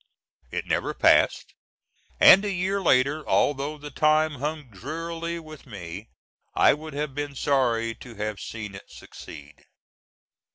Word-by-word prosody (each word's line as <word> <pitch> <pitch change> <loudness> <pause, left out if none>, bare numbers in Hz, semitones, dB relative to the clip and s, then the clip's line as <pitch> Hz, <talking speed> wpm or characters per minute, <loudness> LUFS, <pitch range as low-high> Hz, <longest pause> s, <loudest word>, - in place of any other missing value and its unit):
It - - -4
never - - -1
passed, - - +3 0.7
and 195 - +8
a 205 - -1
year 190 +2 -1
later, 140 -1 +2
although 145 +2 +1
the 145 0 -9
time 155 0 +2
hung 150 -2 -4
drearily 165 - -5
with 155 -3 -13
me, 100 -1 -8 0.5
I - - +5
would 155 0 -8
have 145 -1 -3
been 145 0 -4
sorry 120 -5 +1
to 120 +1 -13
have 105 -1 -4
seen 105 -3 -7
it 95 - -12
succeed. - - -12
145 Hz, 135 wpm, -25 LUFS, 115-155 Hz, 0.7 s, and